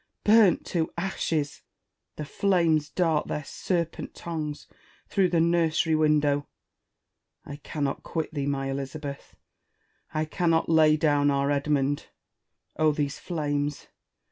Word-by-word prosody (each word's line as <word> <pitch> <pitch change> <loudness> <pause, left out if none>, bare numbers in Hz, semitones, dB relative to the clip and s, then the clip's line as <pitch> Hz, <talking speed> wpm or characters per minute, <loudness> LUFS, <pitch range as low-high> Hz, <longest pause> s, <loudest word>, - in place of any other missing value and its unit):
burnt 210 -3 +5
to 165 -3 -1
ashes! 165 -5 -2 0.5
The 150 - -5
flames 165 -4 +1
dart 165 -4 +1
their 150 - -3
serpent 170 +3 -3
tongues 155 -3 -5 0.4
through 195 -3 +2
the 170 -1 +2
nursery 165 -1 +2
window. 150 -2 +2 1.0
I 145 - -7
cannot 145 -1 -3
quit 160 -1 -4
thee, 140 -2 -2
my 135 -1 -1
Elizabeth! 140 +1 -6 0.8
I 155 0 -1
cannot 165 0 +1
lay 155 -1 +5
down 145 -2 +3
our 140 0 +1
Edmund! 145 0 0 0.7
Oh, 155 -1 +4
these 145 -1 -2
flames 145 -3 -3
155 Hz, 115 wpm, -26 LUFS, 145-165 Hz, 1.0 s, burnt